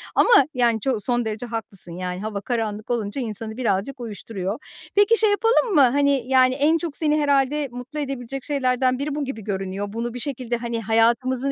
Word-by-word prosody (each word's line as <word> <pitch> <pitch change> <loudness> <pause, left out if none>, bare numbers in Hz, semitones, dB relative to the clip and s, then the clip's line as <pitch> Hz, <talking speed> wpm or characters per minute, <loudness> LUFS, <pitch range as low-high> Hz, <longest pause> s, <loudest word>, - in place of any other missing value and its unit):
Ama - - +4 0.2
yani, 235 -3 +2
ço 250 0 -1
son 240 +1 0
derece 220 +2 -3
haklısın. 220 -6 -5
Yani, 180 +2 -4
hava 210 -2 -4
karanlık 220 -2 -3
olunca 230 +2 -2
insanı 220 0 -5
birazcık 235 +3 -1
uyuşturuyor. 210 -1 -5 0.4
Peki, 410 +3 +5
şey 435 -1 +4
yapalım 455 +1 +2
mı? 290 - +7
Hani, 275 0 +3
yani, 255 -1 +4
en 300 +4 +3
çok 330 -3 -4
seni 305 -1 +1
herhâlde 285 0 +2
mutlu 250 +5 -7
edebilecek 270 -2 -4
şeylerden 255 -3 +1
biri 285 +1 -2
bu 295 - -2
gibi 255 -5 -5
görünüyor. 195 0 -4
Bunu 235 +1 -3
bir 250 - -6
şekilde 245 -3 -3
hani, 235 0 -5
hayatımızı 240 +5 +2
245 Hz, 180 wpm, -23 LUFS, 220-275 Hz, 0.4 s, mı